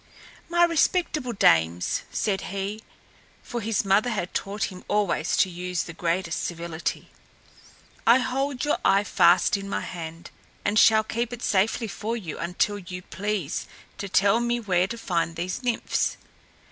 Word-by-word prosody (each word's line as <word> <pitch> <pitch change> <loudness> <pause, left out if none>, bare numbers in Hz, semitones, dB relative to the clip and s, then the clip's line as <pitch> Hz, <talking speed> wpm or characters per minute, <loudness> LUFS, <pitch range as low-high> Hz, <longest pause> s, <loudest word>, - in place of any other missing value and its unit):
"My 345 0 +4
respectable 330 -5 +1
dames," 85 - +3
said 195 -3 0
he 200 +3 -4 0.6
for 240 -1 -4
his 220 -1 0
mother 200 +5 +3
had 200 -6 -3
taught 200 +1 -2
him 185 -1 -11
always 195 -6 +1
to - - +4
use 180 0 -3
the 165 - -8
greatest 170 0 -1
civility 170 -1 -4 1.0
"I 235 +2 +8
hold 265 +1 -1
your 295 - +1
eye 195 +1 +4
fast 185 0 +4
in 195 0 -7
my - - -1
hand 165 -1 -7 0.3
and 210 +1 +3
shall 220 -1 +6
keep 235 +2 -2
it 245 -1 -7
safely 215 +4 +1
for 220 +3 -3
you 175 -9 -6
until 180 +4 0
you 180 -1 -8
please 190 -2 -3 0.3
to 200 - -4
tell 200 +4 +4
me 240 0 0
where 185 -5 +1
to 235 - -6
find 170 -6 -1
these 180 +6 -3
Nymphs. 245 -2 0
200 Hz, 155 wpm, -25 LUFS, 175-230 Hz, 1.0 s, I